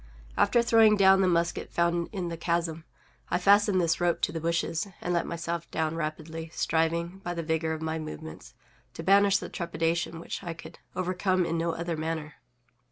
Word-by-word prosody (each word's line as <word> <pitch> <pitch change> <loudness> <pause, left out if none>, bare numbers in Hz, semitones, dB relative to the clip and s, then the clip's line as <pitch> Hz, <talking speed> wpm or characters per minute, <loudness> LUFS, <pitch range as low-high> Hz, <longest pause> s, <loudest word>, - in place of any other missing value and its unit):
After 240 -1 +3
throwing 225 -2 +5
down 190 -1 +6
the 190 - +3
musket 170 -1 0
found 170 0 +1
in 185 -4 -3
the 165 - -4
chasm, 165 -1 -2 0.4
I 175 - +2
fastened 200 +1 +4
this 170 -1 +1
rope 175 -1 +2
to - - +1
the 165 -1 -4
bushes, 165 +3 -1
and 175 - -2
let 170 - 0
myself 170 0 -4
down 160 -1 -1
rapidly, 160 +1 -5
striving, 170 +3 0
by 175 0 -3
the 170 - -3
vigor 160 0 -1
of 160 0 -4
my 160 0 -2
movements, 155 0 -8 0.4
to 165 - -6
banish 200 +2 +5
the - - -6
trepidation 170 -1 -2
which 170 - -6
I 170 -2 -5
could - - -12 0.2
overcome 185 0 0
in 165 - -1
no 165 0 0
other 170 0 -3
manner. 155 -1 -4
170 Hz, 185 wpm, -28 LUFS, 165-180 Hz, 0.4 s, down